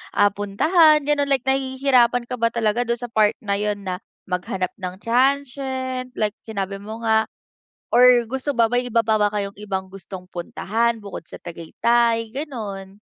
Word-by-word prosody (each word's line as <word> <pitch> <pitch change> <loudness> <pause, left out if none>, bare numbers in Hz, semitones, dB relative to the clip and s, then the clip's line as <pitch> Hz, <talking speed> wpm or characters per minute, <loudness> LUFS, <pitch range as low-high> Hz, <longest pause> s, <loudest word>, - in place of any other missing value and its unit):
ah, 205 0 +4
puntahan, 300 - +4
ganon. 290 -1 +1
Like 270 -3 +1
nahihirapan 260 -2 +2
ka 250 0 -6
ba 230 - +3
talaga 230 +1 0
dun 235 - +1
sa 240 -1 -8
part 215 -2 +3
na 200 -1 -1
yun 205 -1 -2
na 185 -1 -4 0.2
maghanap 185 0 -3
ng 185 0 -5
transient. 260 0 0
Like 210 -1 0 0.2
sinabi 195 -2 -4
mo 220 +3 -8
nga 220 0 +3 0.6
or 245 0 +6
gusto 265 +3 -2
ba 230 -1 +5
may 245 0 +1
iba 230 -1 +2
pa 220 -1 +3
ba 210 0 +3
kayong 200 -1 -2
ibang 190 -2 -4
gustong 190 -1 -9
puntahan 225 +6 -1
bukod 200 -4 -8
sa - - -10
Tagaytay? 230 +7 0
Ganon. 205 -10 -6
230 Hz, 165 wpm, -22 LUFS, 200-255 Hz, 0.6 s, or